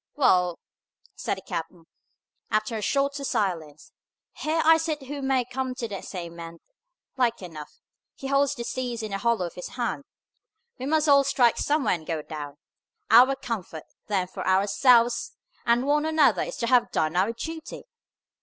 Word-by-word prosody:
"Wa'al!" 180 Hz, -, +3 dB, 0.6 s
said -, -, -2 dB
the -, -, -11 dB
captain, 165 Hz, 0 st, -6 dB, 0.6 s
after 215 Hz, +1 st, 0 dB
a 215 Hz, -, -3 dB
shorter 280 Hz, +4 st, 0 dB
silence, 165 Hz, -, -2 dB, 0.5 s
"Here 315 Hz, +2 st, -1 dB
I 325 Hz, 0 st, +7 dB
sit 310 Hz, -3 st, -3 dB
who 285 Hz, +2 st, -6 dB
may 265 Hz, -2 st, +1 dB
come 255 Hz, +1 st, -4 dB
to 245 Hz, -3 st, -4 dB
the 200 Hz, -3 st, -6 dB
same 170 Hz, -2 st, -7 dB
end, 165 Hz, 0 st, -9 dB, 0.6 s
like 235 Hz, -5 st, +1 dB
enough. 155 Hz, -4 st, -9 dB, 0.4 s
He -, -, -10 dB
holds 275 Hz, +1 st, +2 dB
the 240 Hz, -, -5 dB
seas 240 Hz, -2 st, -4 dB
in 215 Hz, -, -5 dB
the 195 Hz, -, -2 dB
hollow 230 Hz, -3 st, +1 dB
of 170 Hz, -, -7 dB
His 180 Hz, -, -7 dB
hand. 245 Hz, +3 st, -2 dB, 0.7 s
We 260 Hz, -, -4 dB
must 310 Hz, +1 st, +2 dB
all 280 Hz, -1 st, +6 dB
strike 250 Hz, -4 st, +3 dB
somewhere 295 Hz, -6 st, +1 dB
and 160 Hz, -3 st, -5 dB
go 160 Hz, -3 st, -2 dB
down. 145 Hz, -2 st, -7 dB, 0.5 s
Our 250 Hz, +4 st, +7 dB
comfort, 195 Hz, -, -5 dB, 0.2 s
then, 195 Hz, -3 st, 0 dB
for 185 Hz, -, -7 dB
ourselves 230 Hz, +5 st, +3 dB, 0.3 s
and 235 Hz, +2 st, +3 dB
one 295 Hz, +2 st, +2 dB
another 290 Hz, -, +3 dB
is -, -, -4 dB
to 235 Hz, -, -1 dB
have 250 Hz, 0 st, +4 dB
done 155 Hz, +1 st, 0 dB
our 190 Hz, +5 st, +2 dB
duty. 320 Hz, +7 st, -7 dB
235 Hz, 170 wpm, -26 LUFS, 180-275 Hz, 0.7 s, I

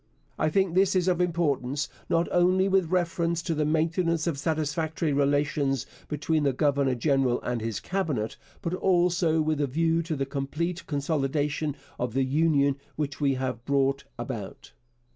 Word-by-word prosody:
I -, -, +2 dB
think 190 Hz, +1 st, +1 dB
this 190 Hz, +1 st, +3 dB
is 185 Hz, -1 st, +2 dB
of 180 Hz, -1 st, +2 dB
importance, 145 Hz, -5 st, 0 dB, 0.2 s
not 170 Hz, 0 st, +2 dB
only 185 Hz, +2 st, +3 dB
with 190 Hz, -4 st, +2 dB
reference 170 Hz, -1 st, 0 dB
to 170 Hz, -, -1 dB
the 150 Hz, -1 st, 0 dB
maintenance 165 Hz, +1 st, +1 dB
of 160 Hz, -5 st, -1 dB
satisfactory 155 Hz, 0 st, -1 dB
relations 140 Hz, -1 st, +1 dB, 0.2 s
between 155 Hz, +1 st, 0 dB
the 140 Hz, -2 st, +2 dB
Governor 140 Hz, -1 st, +2 dB
General 135 Hz, -1 st, +2 dB
and 120 Hz, -2 st, -2 dB
his 110 Hz, -2 st, -3 dB
Cabinet, 150 Hz, -, -2 dB, 0.3 s
but 170 Hz, -1 st, -2 dB
also 175 Hz, -3 st, +2 dB
with 155 Hz, -1 st, 0 dB
a 145 Hz, -, +1 dB
view 165 Hz, +4 st, +1 dB
to 165 Hz, -1 st, -3 dB
the 135 Hz, -1 st, -1 dB
complete 155 Hz, +6 st, -3 dB
consolidation 145 Hz, 0 st, -1 dB, 0.2 s
of 125 Hz, -1 st, -2 dB
the 135 Hz, -, +3 dB
Union 140 Hz, 0 st, +2 dB, 0.2 s
which 145 Hz, -1 st, -3 dB
we 140 Hz, -2 st, +2 dB
have 130 Hz, -3 st, -3 dB
brought 140 Hz, 0 st, +1 dB
about. 120 Hz, -4 st, -6 dB
150 Hz, 160 wpm, -27 LUFS, 140-170 Hz, 0.3 s, this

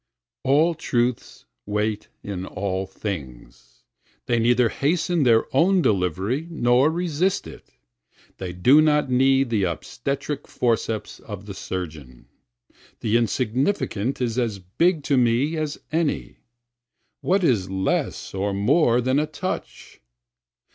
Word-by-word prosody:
30 -, -, -1 dB
All 160 Hz, +5 st, +4 dB
truths 125 Hz, -6 st, -2 dB, 0.2 s
wait 105 Hz, 0 st, -1 dB, 0.2 s
in 95 Hz, -3 st, -5 dB
all 95 Hz, -1 st, -3 dB
things, 80 Hz, -, -8 dB, 0.4 s
They 120 Hz, -1 st, +1 dB
neither 120 Hz, +1 st, +3 dB
hasten 165 Hz, +5 st, 0 dB
their 115 Hz, -4 st, +4 dB
own 180 Hz, +5 st, +4 dB
delivery 100 Hz, -, 0 dB
nor 130 Hz, -3 st, +3 dB
resist 175 Hz, +2 st, 0 dB
it, -, -, -12 dB, 0.7 s
They 90 Hz, -2 st, -4 dB
do 125 Hz, +12 st, +5 dB
not 150 Hz, -3 st, +2 dB
need 135 Hz, 0 st, +3 dB
the 105 Hz, -4 st, +2 dB
obstetric 140 Hz, -, -4 dB
forceps 115 Hz, -3 st, -1 dB
of 100 Hz, -2 st, -9 dB
the 100 Hz, -, -7 dB
surgeon, 75 Hz, -11 st, -7 dB, 0.7 s
The 110 Hz, 0 st, 0 dB
insignificant 120 Hz, -, 0 dB
is 120 Hz, 0 st, 0 dB
as 115 Hz, -5 st, -1 dB
big 145 Hz, -, 0 dB
to 140 Hz, -1 st, +1 dB
me 125 Hz, +6 st, +2 dB
as 155 Hz, -2 st, -3 dB
any, 160 Hz, -1 st, -1 dB, 0.8 s
(What 190 Hz, +1 st, +1 dB
is 110 Hz, -, +2 dB
less 95 Hz, 0 st, -2 dB
or 100 Hz, +1 st, -1 dB
more 120 Hz, +4 st, +3 dB
than 130 Hz, +3 st, +2 dB
a 155 Hz, -, 0 dB
touch?) 155 Hz, +4 st, -6 dB
120 Hz, 125 wpm, -23 LUFS, 100-150 Hz, 0.8 s, do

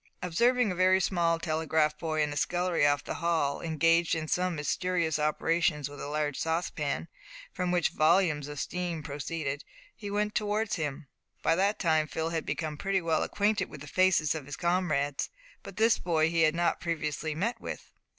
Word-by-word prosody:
Observing 235 Hz, +6 st, +2 dB
a -, -, -3 dB
very 185 Hz, +1 st, +4 dB
small 170 Hz, -3 st, +1 dB
telegraph 160 Hz, -2 st, +1 dB
boy 155 Hz, -2 st, 0 dB
in 150 Hz, -1 st, -2 dB
a -, -, -7 dB
scullery 175 Hz, -1 st, +1 dB
off 145 Hz, 0 st, +1 dB
the -, -, -4 dB
hall, 165 Hz, -4 st, +1 dB
engaged 165 Hz, +1 st, +2 dB
in 160 Hz, -1 st, -3 dB
some 180 Hz, +1 st, 0 dB
mysterious 165 Hz, +1 st, 0 dB
operations 155 Hz, -1 st, +1 dB
with 145 Hz, -1 st, -10 dB
a -, -, -4 dB
large 150 Hz, -1 st, -2 dB
saucepan, 160 Hz, -2 st, -2 dB, 0.5 s
from 180 Hz, -, -2 dB
which 175 Hz, -2 st, +2 dB
volumes 155 Hz, -2 st, +2 dB
of 145 Hz, -1 st, -6 dB
steam 175 Hz, -2 st, -3 dB
proceeded, 145 Hz, 0 st, -4 dB, 0.3 s
he 205 Hz, -2 st, -7 dB
went 210 Hz, +1 st, -1 dB
towards 210 Hz, +1 st, 0 dB
him. 150 Hz, -1 st, -4 dB, 0.4 s
By 165 Hz, -, +3 dB
that 200 Hz, +4 st, +1 dB
time 160 Hz, -4 st, +2 dB
Phil 160 Hz, +1 st, -2 dB
had 165 Hz, -1 st, -3 dB
become 155 Hz, -2 st, -3 dB
pretty 195 Hz, +3 st, 0 dB
well 165 Hz, -3 st, 0 dB
acquainted 210 Hz, +1 st, 0 dB
with 140 Hz, -, -10 dB
the 145 Hz, -, -9 dB
faces 185 Hz, -3 st, +3 dB
of 155 Hz, -4 st, -6 dB
his 145 Hz, -3 st, -6 dB
comrades, 170 Hz, -6 st, 0 dB, 0.3 s
but 195 Hz, -, -11 dB
this 225 Hz, +1 st, +4 dB
boy 160 Hz, -2 st, +1 dB
he 165 Hz, -1 st, +2 dB
had 155 Hz, 0 st, +4 dB
not 170 Hz, 0 st, +1 dB
previously 155 Hz, -2 st, -2 dB
met 210 Hz, +9 st, -2 dB
with. -, -, -7 dB
165 Hz, 180 wpm, -29 LUFS, 150-180 Hz, 0.5 s, very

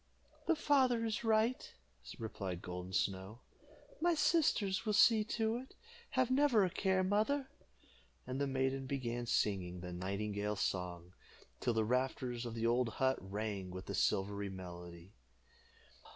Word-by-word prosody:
"The 335 Hz, -, +4 dB
father 260 Hz, -6 st, +3 dB
is 220 Hz, +1 st, -2 dB
right," 225 Hz, +2 st, +1 dB, 0.4 s
replied 95 Hz, -5 st, -5 dB
Golden 90 Hz, +1 st, -6 dB
Snow. 95 Hz, +5 st, -1 dB, 0.6 s
"My 345 Hz, 0 st, +3 dB
sisters 260 Hz, -, +2 dB
will 215 Hz, -2 st, 0 dB
see 215 Hz, +1 st, +6 dB
to 225 Hz, +1 st, 0 dB
it. 260 Hz, +2 st, -10 dB, 0.4 s
Have 255 Hz, -1 st, +3 dB
never 260 Hz, -7 st, +4 dB
a 180 Hz, -, -2 dB
care, 190 Hz, 0 st, +1 dB
mother;" 220 Hz, +8 st, +1 dB, 0.7 s
and 130 Hz, +2 st, -3 dB
the 140 Hz, -, +1 dB
maiden 135 Hz, 0 st, -1 dB
began 120 Hz, -3 st, -3 dB
singing 90 Hz, -5 st, 0 dB
the 90 Hz, 0 st, -6 dB
nightingale's 100 Hz, +2 st, -2 dB
song, 90 Hz, -1 st, -3 dB, 0.5 s
till 120 Hz, -2 st, 0 dB
the 110 Hz, -1 st, +2 dB
rafters 125 Hz, 0 st, -1 dB
of 115 Hz, -, -6 dB
the 115 Hz, 0 st, -1 dB
old 120 Hz, +1 st, +2 dB
hut 130 Hz, 0 st, +2 dB
rang 100 Hz, 0 st, -4 dB
with 95 Hz, +1 st, -7 dB
the -, -, -5 dB
silvery 100 Hz, +1 st, 0 dB
melody. 90 Hz, 0 st, -9 dB
120 Hz, 140 wpm, -36 LUFS, -, 0.7 s, see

